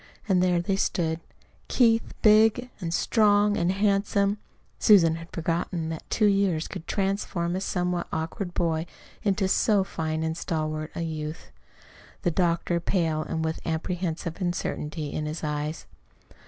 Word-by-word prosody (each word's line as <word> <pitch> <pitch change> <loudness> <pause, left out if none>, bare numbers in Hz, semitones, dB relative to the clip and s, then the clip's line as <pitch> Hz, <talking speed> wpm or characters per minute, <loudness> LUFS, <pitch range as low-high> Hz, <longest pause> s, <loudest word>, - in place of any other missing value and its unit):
And 185 -3 +3
there 180 -1 +3
they 190 +3 0
stood: 160 -4 0 0.5
Keith, 230 -2 +2
big 220 +3 +5
and 170 -4 -3
strong 205 +2 +3
and 175 -1 +1
handsome 200 0 +1 0.4
(Susan 165 -6 +6
had 165 0 -10
forgotten 165 0 -2
that 160 -1 -7
two 215 - +2
years 195 -5 +2
could 165 - -8
transform 190 -3 -1
a 190 - -2
somewhat 180 -2 -1
awkward 175 +3 -4
boy 165 -1 0 0.3
into 195 -1 +1
so 200 +1 +3
fine 160 -4 -3
and 160 0 -1
stalwart 155 -1 -2
a - - -3
youth); 155 - -5 0.7
the 175 - +2
doctor, 170 0 +1
pale, 165 -3 0
and 160 +1 -2
with 160 0 -2
an 165 - -1
apprehensive 170 0 -3
uncertainty 155 -4 -3
in 150 - -2
his 155 +2 -5
eyes. 150 +1 -3
175 Hz, 145 wpm, -26 LUFS, 160-195 Hz, 0.7 s, Susan